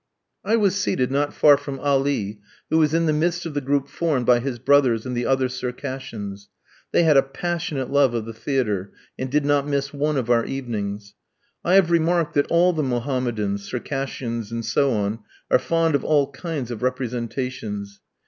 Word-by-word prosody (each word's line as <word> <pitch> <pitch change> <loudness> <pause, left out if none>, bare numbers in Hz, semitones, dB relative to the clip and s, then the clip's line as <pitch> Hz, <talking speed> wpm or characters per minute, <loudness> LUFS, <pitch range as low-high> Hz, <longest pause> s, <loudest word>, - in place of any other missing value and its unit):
I 225 - +2
was 205 -5 +3
seated 135 -10 0
not 145 +1 +1
far 145 -2 +6
from 140 -1 -6
Ali, 135 -7 0 0.3
who 160 - +4
was 155 -2 +3
in 165 +1 +2
the 155 - +2
midst 170 +3 0
of 165 - -4
the 145 - -1
group 140 +1 0
formed 145 -6 -1
by 120 0 +5
his 125 0 -3
brothers 130 -3 +3
and 125 -1 -3
the 120 - -1
other 130 -1 +2
Circassians. 125 -5 -6 0.4
They - - +4
had 155 -3 +5
a - - +8
passionate 155 -1 -3
love 140 -4 +3
of 115 -2 -2
the 115 - -7
theatre, 110 -6 -1 0.3
and 130 - -3
did 145 +2 +1
not 145 0 +2
miss 140 0 -1
one 150 +1 0
of 125 -3 -1
our 115 -1 +4
evenings. 105 -6 -4 0.5
I 180 - +3
have 185 -3 +5
remarked 170 -1 +2
that 145 - +1
all 175 +2 +4
the 155 - -1
Mohammedans, 120 -6 -1
Circassians, 125 -4 -4
and 115 0 -3
so 140 -1 +2
on, 105 0 -1 0.3
are - - +6
fond 165 +2 +1
of 140 - +1
all 145 -2 +2
kinds 140 -4 -5
of 115 - -6
representations. 120 -5 -3
135 Hz, 185 wpm, -23 LUFS, 120-150 Hz, 0.5 s, a